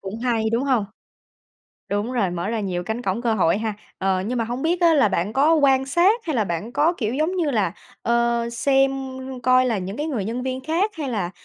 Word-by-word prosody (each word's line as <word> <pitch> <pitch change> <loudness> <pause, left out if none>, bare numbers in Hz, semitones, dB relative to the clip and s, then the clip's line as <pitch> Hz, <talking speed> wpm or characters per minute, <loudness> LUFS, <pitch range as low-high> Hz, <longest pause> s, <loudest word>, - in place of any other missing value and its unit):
Cũng 195 +3 -6
hay, 230 -2 0
đúng 235 +4 +1
hông? 255 -7 +2 1.0
Đúng 205 +5 -2
rồi, 220 -8 +1
mở 175 +3 -3
ra 225 -1 -1
nhiều 180 -3 -2
cánh 220 +5 -3
cổng 200 +2 -2
cơ 230 -2 +1
hội 185 -2 +2
ha. 220 -1 -2 0.2
Ờ, 190 -1 +1
nhưng 245 +2 -2
mà 230 - 0
hông 240 +3 -4
biết 340 +3 0
á, 335 -2 +5
là 275 -8 +4
bạn 195 +2 -1
có 290 +6 +4
quan 270 -4 +3
sát 355 - +3
hay 310 -5 -1
là 220 - +2
bạn 175 +6 -4
có 305 +6 +3
kiểu 225 -4 -2
giống 315 +6 0
như 330 -5 +1
là, 210 -9 0 0.3
ờ, 235 0 +1
xem 270 +3 +3 0.5
coi 255 0 +4
là 230 -4 0
những 190 +3 -5
cái 295 - -2
người 255 -11 -2
nhân 235 +4 -3
viên 260 0 -3
khác 340 +8 +1
hay 290 -3 -3
là, 205 -8 -2
235 Hz, 235 wpm, -22 LUFS, 210-275 Hz, 1.0 s, á